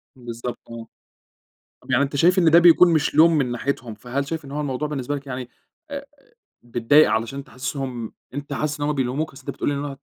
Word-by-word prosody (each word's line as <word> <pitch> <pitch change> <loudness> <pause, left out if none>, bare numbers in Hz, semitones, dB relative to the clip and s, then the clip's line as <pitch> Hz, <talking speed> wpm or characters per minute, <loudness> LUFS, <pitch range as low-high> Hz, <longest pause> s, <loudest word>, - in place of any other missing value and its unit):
بالضبط 120 -1 -6
آه، 115 -1 -8 0.9
طب - - -9
يعني 130 +3 +4
أنت 140 0 -3
شايف 180 +6 +4
إن 165 -3 +4
ده 170 - +8
بيكون 175 0 +6
مش 150 -2 +1
لوم 160 0 +6
من 125 -4 0
ناحيتهم، 120 -3 -3
فهل 130 +5 -4
شايف 160 -2 -4
إن 135 - -10
هو 150 - -3
الموضوع 145 +1 -2
بالنسبة 145 -1 -3
لَك 140 0 -8
يعني 125 -1 -5 0.4
آآ 280 0 -6 0.6
بتضايق 120 +6 +4
علشان 115 +5 -2
تحسّسهم 130 -2 -5 0.2
أنت 145 0 -6
حاسس 150 +1 -2
إن 145 - 0
هم 150 - +1
بيلوموك؟ 135 +3 -2
أصل 135 0 -14
أنت - - -2
بتقول - - -3
لي 145 - 0
إن 140 +1 -3
هو 140 -2 -6
140 Hz, 215 wpm, -23 LUFS, 125-150 Hz, 0.9 s, ده